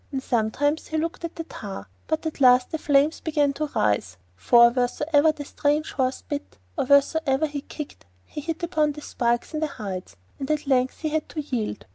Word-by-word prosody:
And 265 Hz, -2 st, -3 dB
sometimes 265 Hz, +7 st, 0 dB
he 315 Hz, -, -2 dB
looked 330 Hz, +2 st, -3 dB
at 335 Hz, -, -7 dB
the 330 Hz, -, -4 dB
tar, 195 Hz, -, -8 dB, 0.2 s
but 315 Hz, +1 st, -1 dB
at 315 Hz, -2 st, -4 dB
last 250 Hz, -1 st, +6 dB
the 320 Hz, -, -2 dB
flames 290 Hz, +1 st, +3 dB
began 295 Hz, -3 st, +1 dB
to 305 Hz, +2 st, -2 dB
rise, 100 Hz, -3 st, +1 dB, 0.2 s
for 235 Hz, -, +6 dB
wheresoever 290 Hz, +5 st, +2 dB
the 295 Hz, -2 st, -8 dB
strange 295 Hz, +2 st, 0 dB
horse 260 Hz, -1 st, -1 dB
bit 290 Hz, -1 st, -6 dB, 0.2 s
or -, -, 0 dB
wheresoever 280 Hz, +1 st, +3 dB
he 290 Hz, -2 st, -4 dB
kicked 290 Hz, -, -9 dB, 0.2 s
he 300 Hz, -, -7 dB
hit 330 Hz, +2 st, -4 dB
upon 310 Hz, -3 st, +1 dB
the 300 Hz, -, -9 dB
spikes 240 Hz, 0 st, -1 dB
in 310 Hz, -, -1 dB
the 310 Hz, -, 0 dB
hides, 195 Hz, -9 st, -6 dB, 0.2 s
and 270 Hz, -, -4 dB
at 305 Hz, -1 st, 0 dB
length 260 Hz, -2 st, +1 dB
he 310 Hz, -, -1 dB
had 310 Hz, 0 st, -2 dB
to 310 Hz, -, -4 dB
yield. 245 Hz, -, -3 dB
290 Hz, 200 wpm, -25 LUFS, 250-310 Hz, 0.2 s, last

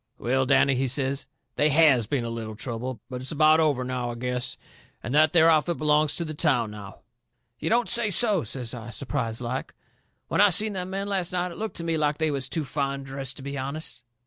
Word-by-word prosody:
"Well, 130 Hz, +2 st, 0 dB
Danny," 140 Hz, +1 st, +4 dB
he 130 Hz, +1 st, 0 dB
says, 135 Hz, +1 st, -1 dB, 0.3 s
"they 150 Hz, -, +4 dB
HAS 140 Hz, -7 st, +4 dB
been 130 Hz, 0 st, -1 dB
a 115 Hz, -, -4 dB
little 110 Hz, -2 st, -6 dB
trouble. 120 Hz, +2 st, -4 dB
But 125 Hz, -1 st, -6 dB
it's 130 Hz, -, -4 dB
about 155 Hz, +1 st, +5 dB
over, 145 Hz, -5 st, +2 dB
now, 125 Hz, -1 st, -3 dB
I 120 Hz, -, -5 dB
guess. 125 Hz, +1 st, -2 dB, 0.5 s
And 120 Hz, -, -4 dB
that 155 Hz, +1 st, +5 dB
there 165 Hz, -2 st, +5 dB
outfit 165 Hz, +1 st, +3 dB
belongs 150 Hz, 0 st, +2 dB
to 170 Hz, -, -3 dB
the 155 Hz, -, -5 dB
town 135 Hz, -8 st, +1 dB
now." 100 Hz, -2 st, -10 dB, 0.6 s
"You -, -, -2 dB
don't 240 Hz, +1 st, +2 dB
say 235 Hz, -2 st, +2 dB
so!" 205 Hz, -2 st, +3 dB
says 120 Hz, +2 st, -4 dB
I, 120 Hz, -2 st, -8 dB
surprised 120 Hz, -2 st, -3 dB
like. 125 Hz, +2 st, -4 dB, 0.5 s
"When -, -, +1 dB
I 205 Hz, -, +7 dB
seen 210 Hz, +4 st, +3 dB
them 185 Hz, -1 st, -4 dB
men 195 Hz, +1 st, -3 dB
last 190 Hz, -3 st, -1 dB
night 180 Hz, 0 st, -1 dB
it 170 Hz, -, -10 dB
looked 220 Hz, 0 st, -4 dB
to 170 Hz, -, -4 dB
me 165 Hz, -1 st, 0 dB
like 150 Hz, -1 st, 0 dB
they 160 Hz, -1 st, +1 dB
was 135 Hz, -3 st, -3 dB
too 150 Hz, +2 st, -2 dB
fine 140 Hz, 0 st, -3 dB
dressed 135 Hz, -1 st, -4 dB
to 135 Hz, -, -9 dB
be 140 Hz, 0 st, -5 dB
honest." 140 Hz, -1 st, -4 dB
140 Hz, 225 wpm, -26 LUFS, 125-160 Hz, 0.6 s, I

